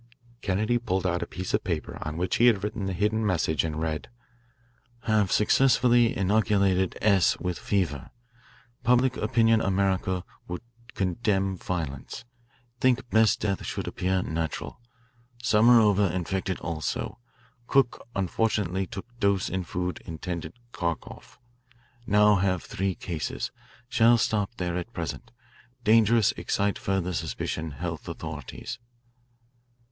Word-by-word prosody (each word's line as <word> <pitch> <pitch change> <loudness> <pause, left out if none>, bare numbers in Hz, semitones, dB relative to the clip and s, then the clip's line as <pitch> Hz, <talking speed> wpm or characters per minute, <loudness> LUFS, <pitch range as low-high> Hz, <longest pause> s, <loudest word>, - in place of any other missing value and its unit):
Kennedy 110 +5 +1
pulled 95 -5 -1
out 90 -1 0
a - - -3
piece 95 -1 -5
of - - +1
paper - - -3
on 75 +1 -4
which 90 +1 0
he 120 - +5
had 105 -5 +3
written 105 -1 -3
the 95 - -2
hidden 105 +4 0
message 85 -6 +1
and 80 -1 -3
read: 80 -1 -3 0.9
"Have 105 -4 +2
successfully 120 0 +4
inoculated 100 -2 +2
S. 100 -6 +4
with 90 -1 -3
fever. 85 -9 -1 0.7
Public 125 +1 +3
opinion 115 0 +3
America 95 -1 0 0.2
would 90 0 -5 0.3
condemn 95 0 0
violence. 80 - -5 0.5
Think 130 -1 +1
best 110 0 +4
death 100 -3 -1
should - - -4
appear 95 0 0
natural. 80 +6 -4 0.6
Samarova 105 -4 +5
infected 95 +1 -2
also. 80 - -3 0.5
Cook 135 -4 +2
unfortunately 95 -1 0
took 100 -2 -7
dose 100 -3 +2
in 95 0 -2
food 90 +1 -3
intended 85 -1 -5 0.2
Kharkoff. 85 -5 -5 0.7
Now 105 0 +5
have 95 -1 0
three 95 -1 -2
cases. 85 -4 -4 0.4
Shall 120 -1 +5
stop 105 -1 0
there 90 -3 -2
at 90 +7 -5
present. 85 +6 -5 0.5
Dangerous 110 -1 +5
excite 100 0 -1
further 95 -2 -1
suspicion 80 -1 -3
health 80 +2 -5
authorities." - - -7
95 Hz, 120 wpm, -27 LUFS, 90-110 Hz, 0.9 s, he